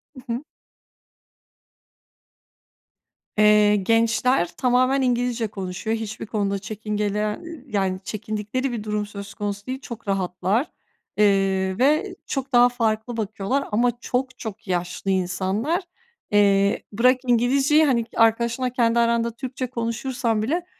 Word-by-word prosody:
I - - -10
hı. 245 +5 -4 2.9
Eee, 210 0 +5
gençler 230 +1 +2
tamamen 255 +2 +3
İngilizce 245 -2 0
konuşuyor. 200 +2 -3
Hiçbir 220 -1 -6
konuda 200 -2 -1
çekingeler 210 0 -2
y 335 - -10
y 315 -6 -10
yani 190 -5 -1
çekindikleri 215 +6 -3
bir 230 -3 -4
durum 210 -1 -2
söz 200 -1 -9
konusu 205 -1 -4
değil. 260 +1 -3
Çok 230 -4 -9
rahatlar, 195 - 0 0.5
eee, 195 -2 +2
ve 305 +9 +2
çok 270 -1 -4
daha 245 0 +7
farklı 230 -1 -1
bakıyorlar 220 +5 -2
ama 240 +4 +3
çok 255 +1 -2
çok 215 -2 -7
yaşlı 180 +1 -2
insanlar. 190 - 0 0.5
Eee, 200 -1 +3
bırak 250 +5 +4
İngilizceyi 270 +6 +4
hani 240 -5 +2
arkadaşınla 235 +2 +2
kendi 235 -1 +2
aranda 235 0 +2
Türkçe 255 0 -4
konuşursan 235 -1 -2
bile 330 +10 -1
225 Hz, 120 wpm, -23 LUFS, 205-250 Hz, 2.9 s, daha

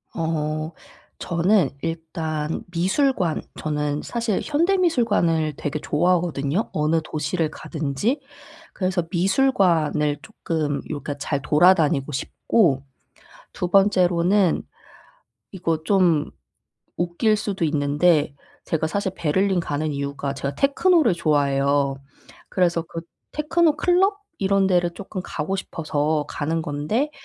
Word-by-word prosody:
어 155 -1 -2 0.5
저는 175 -1 +2
일단 160 -1 -3
미술관. 185 - +1 0.2
저는 150 -1 -2
사실 230 -4 -1
현대 335 +6 +2
미술관을 205 - +2
되게 150 +1 -3
좋아하거든요, 170 +1 0
어느 155 +2 +1
도시를 155 +1 -2
가든지. 160 - -2 0.5
그래서 185 -2 -1
미술관을 175 - +2
쪼끔 160 -8 -3
요 - - -6
그러니까 145 -1 -4
잘 145 0 -2
돌아다니고 150 -3 +3
싶고. 140 - +1 0.7
2 180 - -3
번째로는 185 -1 +3 0.9
이거 165 -4 -2
좀 175 -5 +2 0.7
웃길 175 +5 +1
수도 200 -4 -3
있는데 150 0 +2 0.3
제가 160 -1 -1
사실 190 +2 -2
베를린 185 +4 +1
가는 150 -1 -2
이유가 140 0 -3
제가 140 0 -4
테크노를 290 - +3
좋아해요. 140 -3 +1 0.5
그래서 175 -2 +1
그 165 0 -7 0.3
테크노 310 +1 +2
클럽 380 +4 +2 0.2
이런 195 0 +2
데를 175 -2 +2
쪼끔 190 0 -6
가고 160 +4 -3
싶어서 155 -4 -1
가는 160 +2 -2
건데 165 - -1
165 Hz, 255 characters per minute, -23 LUFS, 150-195 Hz, 0.9 s, 돌아다니고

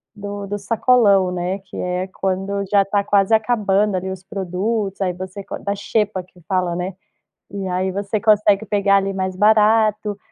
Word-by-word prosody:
do 205 -1 -6
do 205 +1 -4
sacolão, 205 -3 +3
né, 180 +1 -2
que 195 - -15
é 180 0 -2
quando 195 +1 -2
já 200 -1 +4
tá 200 0 0
quase 200 +1 +2
acabando 210 -3 +2
ali 190 +1 -4
os 190 0 -8
produtos. 195 +1 -3
Aí, 185 -2 +1
você 185 +2 -7
co - - -6
da 200 -1 -3
xepa 205 -1 -1
que 180 0 -22
fala, 185 -3 0
né? 180 +2 -3 0.6
E 200 -1 -5
aí, 185 +1 -1
você 200 +2 -2
consegue 210 -1 +3
pegar 200 -1 +3
ali 195 0 -1
mais 185 -1 -3
barato. 215 0 +3
200 Hz, 175 wpm, -20 LUFS, 190-210 Hz, 0.6 s, já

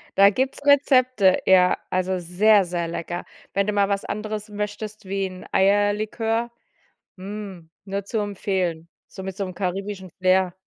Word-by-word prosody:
Da 200 +1 +7
gibt’s 265 +4 -2
Rezepte. 255 -8 +4
Ja, 180 -1 +5
also 185 0 0
sehr, 190 +3 +3
sehr 170 -1 -2
lecker. 175 +1 -5 0.3
Wenn 200 +1 +1
du 210 - 0
mal 200 -1 +2
was 200 0 -1
anderes 215 0 -4
möchtest 210 +1 -5
wie 195 0 -1
'n 185 0 -10
Eierlikör, 210 +4 +1 0.7
mm, 195 -3 -8
nur 200 0 -4
zu 220 +2 -2
empfehlen, 185 -5 -2 0.2
so 190 - -9
mit 190 -1 -5
so 200 - -3
'nem 185 -1 -5
karibischen 195 0 -4
Flair. 185 -1 +3
200 Hz, 150 wpm, -23 LUFS, 185-210 Hz, 0.7 s, Da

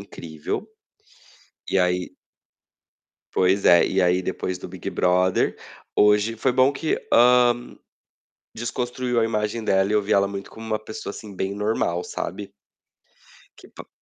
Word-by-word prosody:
incrível. 80 -6 -6 1.0
E 95 - +2
aí 90 0 0 1.2
Pois 95 +2 +2
é. 85 -1 +7
E 95 0 +1
aí, 90 +1 +2
depois 95 0 -3
do - - -8
Big 90 -1 -6
Brother, 90 +1 +1 0.4
hoje 105 +2 +3
foi 125 +3 +1
bom 130 +2 +4
que, 155 +3 -1 0.2
hã, 120 0 +4 0.8
desconstruiu 125 +1 -2
a - - +3
imagem 110 0 -2
dela 95 0 +2
e - - 0
eu 105 - +3
vi 100 - -1
ela 100 0 +3
muito 100 -1 -7
como 110 0 -10
uma 110 -1 -1
pessoa, 110 -1 -7
assim, 100 -1 -10
bem 95 +1 -3
normal, 100 -4 -1
sabe. - - -6 1.1
Que - - -15
pa - - -13
105 Hz, 145 wpm, -23 LUFS, 95-115 Hz, 1.2 s, é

